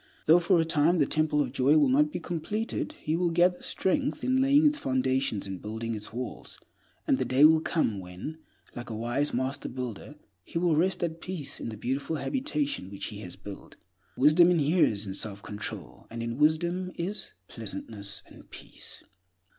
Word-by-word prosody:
Though 165 +3 +7
for 175 0 +3
a 165 - +2
time 160 +2 +3
the 145 - +4
Temple 155 0 +1
of 125 - -5
Joy 140 +3 +4
will 145 -2 +5
not 150 +4 +3
be 180 - -3
completed, 205 - -3
he 155 - 0
will 175 0 +1
gather 175 +2 +3
strength 275 +8 0
in 260 0 +2
laying 280 +3 +5
its 295 0 +3
foundations 130 -4 0
and 95 -2 -6
building 110 +2 -4
its 105 -1 -6
walls; 125 +2 -6 0.5
and 275 -4 +2
the - - +2
day 135 +3 +5
will 160 0 +6
come 115 - 0
when, 95 - -7 0.4
like 120 0 -7
a 110 - -4
wise 120 +6 -1
master 130 +3 -2
builder, 125 +2 -6 0.3
he 165 - -5
will 170 -2 +2
rest 180 +3 +1
at 165 -1 -3
peace 175 -7 -3
in - - -4
the 110 - -7
beautiful 135 +8 -2
habitation 280 - -2
which 100 0 -5
he 105 - -8
has 90 -4 -8
built. 100 -1 -10 0.4
Wisdom 155 +6 +6
inheres 150 - +3
in 95 - -5
self 100 0 -3
control 105 0 -7
and 115 0 -5
in 115 +3 -4
wisdom 170 +4 +2
is 190 +5 -3
"pleasantness 100 -1 -5
and - - -16
peace." - - -9
150 Hz, 185 wpm, -28 LUFS, 115-175 Hz, 0.5 s, Though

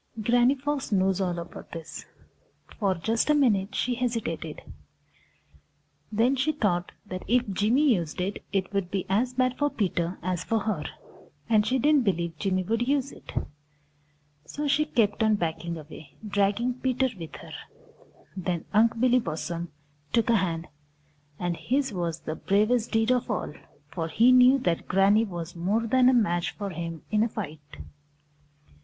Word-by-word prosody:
Granny 245 +4 +3
Fox 280 -1 -3
knows 190 -1 +2
all 180 -2 -1
about 170 - -9
this. 165 -2 -8 0.7
For 195 -4 +1
just 220 - 0
a 300 - +5
minute 210 -9 +2
she 250 - 0
hesitated. 230 -11 -3 1.5
Then 230 +5 +3
she 275 +4 +1
thought 180 -10 0
that 185 -2 -6
if 245 +3 +2
Jimmy 245 +8 +3
used 170 -6 -3
it, 190 +3 -3
it 195 0 -1
would 195 -3 -1
be 190 -1 -2
as 240 +6 +1
bad 255 0 +1
for 290 0 +2
Peter 180 -6 -1
as 180 -1 -1
for 225 -1 0
her, 195 -8 -2 0.6
and 215 -2 +3
she 260 - +2
didn't 290 +1 +4
believe 170 -5 -1
Jimmy 185 -1 0
would 230 +5 -1
use 275 -1 +1
it. - - -12 1.1
So 290 - -4
she 305 +2 +2
kept 225 -9 +1
on 220 -1 +4
backing 170 -2 -3
away, 155 -1 -12
dragging 205 +5 0
Peter 260 0 +1
with 165 -2 -8
her. - - -11 0.8
Then 180 -3 -3
Unc' 225 +2 +4
Billy 250 +1 +4
Possum 170 -5 -4 0.4
took 230 0 +3
a 230 - +5
hand, 170 -3 -2 0.7
and 175 -1 -2
his 265 +5 -1
was 170 -3 -3
the 155 - -4
bravest 215 +7 +1
deed 225 +1 +2
of 250 -1 +1
all, 210 -8 -2 0.4
for 165 0 -3
he 225 +10 +4
knew 255 +1 +7
that 170 -5 -1
Granny 200 +4 +4
was 175 -3 -6
more 200 +7 0
than 255 +2 +4
a - - +4
match 175 -7 +2
for 200 -2 -5
him 165 -1 -6
in 215 0 +3
a 230 - +2
fight. 160 -9 -6
210 Hz, 160 wpm, -27 LUFS, 175-245 Hz, 1.5 s, knew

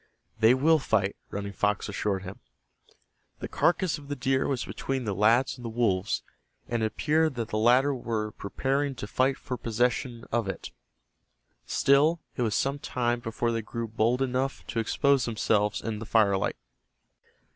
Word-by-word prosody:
"They 115 +3 +6
will 155 +4 +4
fight," 100 -6 +1
Running 100 0 -5
Fox 105 0 0
assured 100 -2 -2
him. 95 0 -8 1.0
The - - -5
carcass 175 -2 +1
of 140 - -13
the 145 - -3
deer 135 0 +1
was 130 -3 -1
between 135 -1 -3
the 105 -3 -2
lads 115 +7 +3
and - - -10
the 115 - -4
wolves, 105 -5 0 0.4
and 120 -1 -1
it 110 - +2
appeared 155 +6 +1
that 115 -2 -3
the 110 - -1
latter 125 +5 +4
were 110 -4 -3
preparing 135 +7 -2
to 105 - -6
fight 130 +5 +1
for 130 -3 -5
possession 120 +1 -1
of 115 -3 0
it. 95 - -6 1.0
Still, 150 +5 +3 0.2
it - - -3
was 110 -3 +1
some 140 +1 0
time 120 -3 -1
before 115 0 -2
they 115 0 -1
grew 115 0 -5
hold 120 +4 +2
enough 130 +1 -2
to 115 - -1
expose 135 +3 +2
themselves 105 -2 +1
in 110 -1 -3
the 115 - -7
firelight. 100 -4 +2
120 Hz, 165 wpm, -28 LUFS, 110-135 Hz, 1.0 s, They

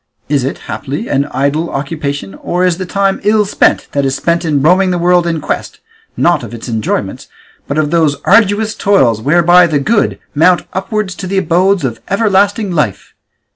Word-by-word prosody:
Is 145 -3 +1
it, 135 - -3
haply, 145 - -5
an 140 +1 +1
idle 145 +5 -1
occupation, 140 -6 -4
or 180 - -2
is 180 -1 0
the 185 - -4
time 195 +1 0
ill 210 +1 +2
spent 200 - +1
that 140 - -1
is 135 0 0
spent 170 +1 0
in 155 -4 0
roaming 185 +4 +3
the 180 - 0
world 175 0 +2
in 165 -2 -1
quest, - - -4 0.4
not 175 0 +2
of 120 - -8
its 115 - -9
enjoyments, 110 -4 -3 0.4
but 140 - -3
of 155 -1 0
those 160 -4 +2
arduous 210 +1 +3
toils 130 - +2
whereby 175 +6 +4
the 155 -3 0
good 205 +10 0 0.2
mount 175 +4 +3
upwards 195 0 -3
to 185 +1 -7
the 195 +1 -2
abodes 185 0 +2
of 115 -3 -4
everlasting 200 0 +1
life? 140 - -2
170 Hz, 180 wpm, -13 LUFS, 140-195 Hz, 0.4 s, whereby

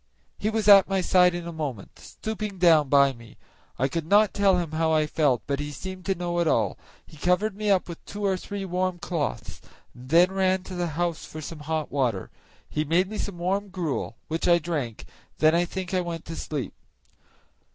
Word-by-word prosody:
He 210 - 0
was 220 -2 -1
at 200 -2 +8
my 195 0 +1
side 180 -1 +4
in 175 -1 -5
a - - -4
moment, 145 - -6
stooping 215 -2 -6
down 160 -5 +5
by 140 -1 +5
me. 115 -3 -15 0.4
I 135 - +1
could 160 +3 -4
not 205 +2 +4
tell 195 -2 +3
him 170 -3 -2
how 160 0 +1
I 155 -1 +3
felt, 145 -7 +1
but 140 -1 -2
he 145 0 -4
seemed 185 +4 -8
to 195 - +1
know 175 0 -2
it 170 - +1
all; 110 -9 +1 0.3
he 155 - -16
covered 180 +6 +1
me 210 0 -2
up 190 -2 +3
with 170 -2 -9
two 205 0 -5
or 195 -1 +2
three 195 +1 -5
warm 185 0 -1
cloths, 130 - -4 0.3
and 125 +1 -13
then 175 +4 +5
ran 190 -1 +1
to 185 - -9
the 175 -1 -1
house 175 -2 -1
for 155 - -9
some 155 +1 -7
hot 155 0 -3
water; 125 -9 -1 0.4
he 150 - -1
made 175 +6 +1
me 215 - -5
some 200 -4 -4
warm 195 +4 -1
gruel, 165 -10 -3
which 160 +1 -2
I 175 -1 +6
drank, 150 -9 -3
and - - -17 0.3
then 155 +1 +4
I 175 +1 +3
think 185 +1 -5
I 185 - +2
went 170 -2 -5
to 165 - -6
sleep. 145 -5 -4
170 Hz, 215 wpm, -26 LUFS, 150-190 Hz, 0.4 s, at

